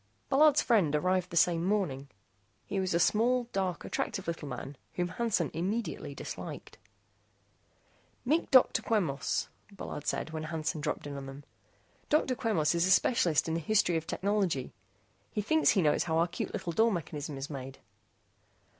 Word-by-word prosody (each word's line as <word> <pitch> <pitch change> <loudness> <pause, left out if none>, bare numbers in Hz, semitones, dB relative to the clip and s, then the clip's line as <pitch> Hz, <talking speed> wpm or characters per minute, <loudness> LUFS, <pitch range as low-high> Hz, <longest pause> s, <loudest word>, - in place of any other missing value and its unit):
Bullard's 295 +1 +5
friend 190 - +3
arrived 185 +3 +1
the 170 - -3
same 170 0 +3
morning. 175 -9 -1 0.6
He 195 - -2
was 185 -2 0
a - - +3
small, 235 +7 +3
dark 190 -2 -2
active - - -2
little 165 -3 -4
man 135 +2 -6 0.2
whom 175 0 -1
Hansen 185 -3 0
immediately 195 +8 -3
disliked. - - -8 1.5
"Meet 310 +7 +1
Dr. 260 -2 +5
Quemos," 170 -11 0 0.2
Bullard 195 -6 -7
said - - -2
when 155 -1 -4
Hansen 155 -1 -3
dropped - - -3
in 145 -1 -6
on 135 -1 -7
them. 135 +2 -9 0.7
"Dr. 295 -3 +2
Quemos 210 - +1
is 170 +1 +2
a - - +2
specialist 175 - +3
in 160 - -1
the 165 - 0
history 190 0 +2
of 160 0 -2
technology. 190 -9 -1 0.6
He 210 - -3
thinks 315 +8 +3
he 190 - +3
knows 150 - +2
how 160 -1 0
our 165 +1 +3
cute - - -4
little 170 - -4
door 225 +5 +3
mechanism 150 -5 -4
is 135 +3 -6
made." 135 -1 -7
175 Hz, 165 wpm, -30 LUFS, 155-210 Hz, 1.5 s, Bullard's